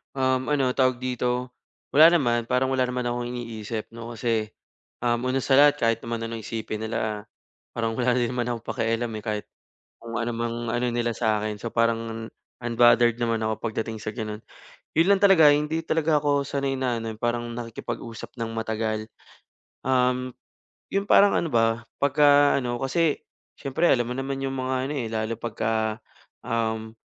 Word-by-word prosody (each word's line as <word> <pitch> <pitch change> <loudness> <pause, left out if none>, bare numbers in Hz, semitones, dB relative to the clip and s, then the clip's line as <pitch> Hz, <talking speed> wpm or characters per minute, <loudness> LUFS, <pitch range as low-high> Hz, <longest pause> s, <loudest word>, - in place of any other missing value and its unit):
Um, 130 -1 +1
ano 135 -4 +2
tawag 130 -1 +1
dito, 125 0 -1 0.4
wala 155 +3 +8
naman, 120 -6 +1
parang 130 +1 +1
wala 130 -1 +2
naman 125 0 -2
akong 120 0 -2
iniisip 115 -3 -5
'no, 115 +1 -8
kasi, 110 -2 -1 0.5
um, 120 -1 +2
una 135 +1 0
sa 135 - +3
lahat 145 0 +7
kahit 115 0 +2
naman 115 0 -3
anong 115 -1 -5
isipin 110 -1 -4
nila, 110 -1 -3 0.5
parang 115 -1 -1
wala 125 -1 +2
din 120 -1 +1
naman 125 -1 -2
akong 120 -2 -4
pakialam, 115 +1 -1
eh. - - -13
Kahit 105 -1 -3 0.5
kung 115 -1 -8
ano 120 +1 -1
mang 115 0 -2 0.2
ano 120 +1 0
nila 120 0 0
sa'kin 110 -2 0
so 115 +3 -6
parang 115 -1 0 0.3
unbothered 120 0 +4
naman 115 -1 0
ako 110 0 -1
pagdating 110 0 -4
sa 110 - -3
gano'n. 110 -2 -4 0.6
Yun 165 +3 +4
lang 200 - +4
talaga 190 -6 +7
hindi 150 +2 +1
talaga 160 -2 +2
ako 145 -1 +2
sanay 140 -1 -1
na 125 -3 0
ano, 115 0 -4
eh, - - -19
parang 120 0 0
nakikipag-usap 115 0 -7
nang 115 0 -3
matagal. 110 -1 -2 0.8
Um, 125 -1 +1 0.6
'yung 195 +1 -1
parang 200 0 +6
ano 170 - -1
ba, 115 0 +2 0.2
pagka 145 0 +5
ano 120 -2 -2
kasi, 155 +3 +1 0.3
siyempre 140 +5 -1
alam 120 -1 +2
mo 125 - -2
naman 135 0 -3
'yung 135 0 -2
mga 130 0 -1 0.2
ano, - - -2
eh, 115 -4 -3
lalo 110 0 -2
pagka 110 -1 -2 0.4
um, 110 -1 -2
120 Hz, 170 wpm, -25 LUFS, 115-130 Hz, 0.8 s, wala